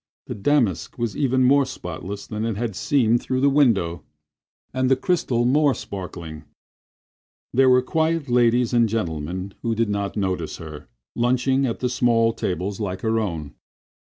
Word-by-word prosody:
The - - -5
damask 110 - 0
was 120 -4 -2
even 130 -2 +1
more 140 +2 +5
spotless 100 -5 -7
than 105 0 -4
it 115 -3 -2
had 115 -3 -3
seemed 120 +1 +2
through 130 0 -2
the 140 0 +4
window, 100 - +2 0.7
and 130 0 +1
the 135 - +5
crystal 130 -6 0
more 140 +2 +3
sparkling. 85 -5 -7 1.1
There 130 +1 +5
were 125 0 +5
quiet 160 +1 0
ladies 120 0 +2
and 120 -2 +3
gentlemen, 90 -2 -3
who 115 -1 -1
did 115 -1 0
not 100 0 -2
notice 95 -5 -2
her, 75 -2 -10 0.3
lunching 130 +3 +1
at 115 - -4
the 125 - +1
small 120 -2 +2
tables 95 0 -3
like 95 -3 -3
her 115 0 +1
own. 80 -9 -4
115 Hz, 155 wpm, -23 LUFS, 95-130 Hz, 1.1 s, more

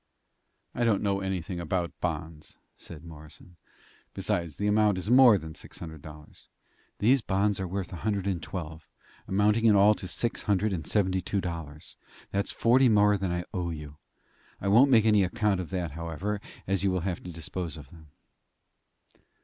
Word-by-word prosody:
"I 120 - -1
don't 110 -4 +2
know 100 -1 +1
anything 95 -2 -3
about 85 +1 -2
bonds," 80 -2 -5 0.2
said 80 -2 -11
Morrison. 80 +2 -13 0.6
"Besides, 85 -3 -2
the 100 - -2
amount 105 -1 +3
is 95 +5 -2
more 125 -4 +8
than 80 -3 -8
six - - -10
hundred 80 -3 -9
dollars." 75 0 -13 0.5
"These 125 +5 +3
bonds 100 0 0
are 95 - -2
worth 95 +1 -4
a - - -5
hundred 100 0 -2
and 95 -4 -1
twelve, 80 -4 -7 0.4
amounting 105 +4 +2
in 110 -2 +6
all 100 +2 +6
to 95 - -7
six 115 +5 -2
hundred 105 0 +1
and 80 -4 -4
seventy 95 -3 +1
two 100 +3 -2
dollars. 80 -5 -6 0.3
That's 100 0 -1
forty 125 +2 +4
more 105 -1 +4
than 95 -2 -2
I 90 0 -2
owe 90 -2 -2
you. 75 -2 -8 0.6
I 100 - -2
won't 120 +7 +6
make 115 -4 +5
any 105 -3 +4
account 105 0 0
of 90 - -5
that, 90 -4 -3
however, 85 +6 -4 0.2
as 95 0 0
you 100 - +3
will 90 -1 -1
have 90 -1 -3
to 90 - -8
dispose 85 0 -5
of 70 -3 -12
them." 80 -2 -15
95 Hz, 180 wpm, -28 LUFS, 85-105 Hz, 0.6 s, more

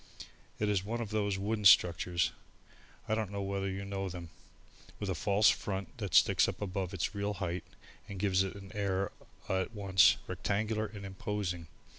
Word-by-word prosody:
It 105 - 0
is 100 -3 +1
one 115 +4 -3
of 110 -3 -4
those 100 -2 0
wooden 105 +2 -2
structures 90 -2 +5 0.8
I - - 0
don't 110 -3 -1
know 100 0 -3
whether 100 0 -2
you 95 +1 -4
know 95 -1 -3
them 85 -2 -8 0.7
with 100 -2 -2
a - - +1
false 100 +5 +4
front 95 -3 -4
that - - -2
sticks - - +6
up - - -4
above 95 -2 -3
its 95 +1 -2
real 100 0 -2
height 90 -2 -3 0.4
and 100 - -6
gives 95 -1 +2
it 95 0 -2
an 95 -1 -10
air 100 -2 -1 0.4
at 95 +4 -1
once 95 -5 +5
rectangular 110 +1 -1
and 100 -2 -9
imposing. 95 -3 -3
100 Hz, 175 wpm, -32 LUFS, 95-105 Hz, 0.8 s, sticks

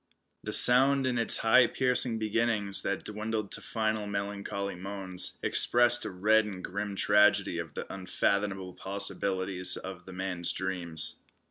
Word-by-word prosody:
The - - -4
sound 135 +2 +5
in 125 -2 0
its 115 - +2
high 125 +3 +6
piercing 125 -2 +1
beginnings, 110 -2 0
that 100 - -3
dwindled 110 -1 -4
to - - -1
final 110 -2 -2
melancholy 100 0 -4
moans, 95 0 -3
expressed 120 0 +3
a - - -3
red 105 +4 +3
and 95 -3 -7
grim 100 +2 -4
tragedy 100 -3 +3
of 85 -2 -7
the - - -5
unfathomable 95 0 -2
possibilities 95 -1 -2
of 95 -1 -9
the 95 - -9
man's 90 -2 -3
dreams. 85 -4 -2
100 Hz, 140 wpm, -29 LUFS, 95-110 Hz, -, high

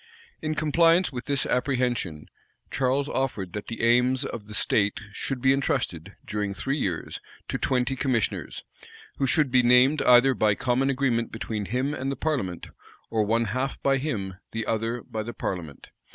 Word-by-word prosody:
In 155 0 -2
compliance 165 +4 +3
with 125 -2 -6
this 140 -1 0
apprehension, 125 - -1 0.5
Charles 135 +2 +1
offered 110 - -2
that 105 - -5
the 115 +1 +3
arms 130 +2 0
of 110 -5 -6
the 105 - -5
state 100 -1 +1
should 130 +4 -3
be 135 0 +5
intrusted, 100 - -2
during 105 -2 -3
three 135 +8 -2
years, 90 -9 -3 0.3
to - - -2
twenty 125 0 0
commissioners, 130 -5 -1 0.5
who 135 - +1
should 145 -1 +2
be 130 0 +5
named 125 +4 +5
either 125 +2 +6
by 105 -4 +2
common 130 +4 +1
agreement 125 -4 0
between 110 -2 -4
him 130 +7 -1
and 135 -1 -3
the - - -2
parliament, 120 - -2 0.4
or 110 - +2
one 115 +2 +1
half 130 +6 -2
by 135 0 +3
him, 100 -10 -3 0.2
the 115 -1 -2
other 115 +2 -2
by 110 - -5
the 120 +2 -6
parliament. 80 -7 -5
125 Hz, 165 wpm, -26 LUFS, 110-135 Hz, 0.5 s, either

